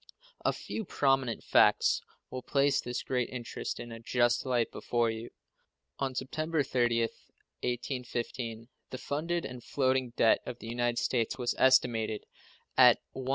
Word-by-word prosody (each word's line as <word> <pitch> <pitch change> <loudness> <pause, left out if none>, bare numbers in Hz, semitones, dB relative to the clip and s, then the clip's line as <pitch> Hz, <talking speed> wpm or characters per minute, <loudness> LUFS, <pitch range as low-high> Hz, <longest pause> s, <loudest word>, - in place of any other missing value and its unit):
A - - +3
few 220 - -5
prominent 135 - +1
facts - - +4 0.3
will 130 - -4
place 140 +2 +2
this 125 +1 -4
great 125 -2 -1
interest 120 -2 -5
in 120 - -7
a 115 - -7
just 120 +2 +1
light 120 -3 +1
before 120 -1 0
you. 110 +1 -6 0.7
On 135 -1 -2
September 155 +4 -1
30th, 120 -3 0 0.3
1815, 120 -2 -3 0.2
the 130 - -5
funded 165 +6 -2
and 125 -2 -7
floating 130 -2 +1
debt 110 - +4
of 120 - -6
the - - -11
United 120 0 0
States 120 -1 0
was 125 -2 0
estimated 120 -5 +3 0.5
at - - +8 0.2
$119,635,558. 130 -1 -5
125 Hz, 145 wpm, -30 LUFS, 120-130 Hz, 0.7 s, at